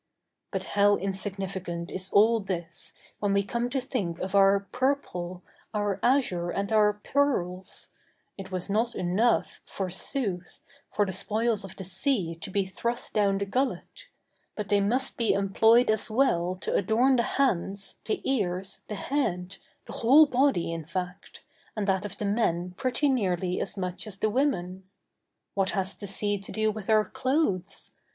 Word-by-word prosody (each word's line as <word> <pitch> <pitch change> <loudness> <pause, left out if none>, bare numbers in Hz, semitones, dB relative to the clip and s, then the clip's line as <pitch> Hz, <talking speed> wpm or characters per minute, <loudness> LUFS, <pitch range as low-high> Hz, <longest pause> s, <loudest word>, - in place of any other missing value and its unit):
But - - -3
how 205 0 +5
insignificant 190 -3 -3
is 185 0 -3
all 225 +3 +5
this 175 -4 -5 0.2
when 205 -1 +1
we 200 0 +3
come 235 +4 -2
to 265 +2 -1
think 215 -10 -3
of 190 +2 -5
our 195 0 +5
purple, 185 -10 -2 0.3
our 205 -2 0
azure, 240 -10 +2
and 200 +3 -2
our 210 -1 +4
pearls; 205 -6 -1 0.4
it 195 -1 -8
was 185 -1 -2
not 225 +4 0
enough, 190 +7 +1
forsooth, 190 0 -3 0.3
for 205 - +2
the 190 - -4
spoils 220 +3 0
of 195 - -9
the 190 - -7
sea 190 - 0
to 165 +2 -8
be 195 0 0
thrust 235 +6 -2
down 200 -2 +2
the 200 - -1
gullet—but 215 -2 -5
they 205 -1 +3
must 255 +7 0
be 230 -2 +2
employed 220 +4 +4
as 215 - 0
well 185 -7 +2
to - - -2
adorn 235 +7 +3
the - - +4 0.2
hands, 195 -6 0
the 420 -3 -2
ears, 195 -6 -1
the 210 - -4
head, 195 -8 -2 0.3
the - - -9
whole 275 +7 +6
body, 260 - +1
in 165 -1 -4
fact, 180 +3 -6 0.3
and 210 -2 -1
that 190 0 +1
of 205 0 -7
the 210 - -3
men 180 -4 0
pretty 255 +6 0
nearly 185 -8 0
as - - -4
much 185 +2 -3
as 200 -2 -7
the 215 +1 0
women. 190 -8 0 0.7
What 195 -1 +1
has 190 0 0
the 205 - -8
sea 205 +1 0
to 195 - -8
do 220 0 +1
with 215 -1 -7
our 215 -1 +5
clothes? 255 - -1
200 Hz, 160 wpm, -27 LUFS, 185-235 Hz, 0.7 s, whole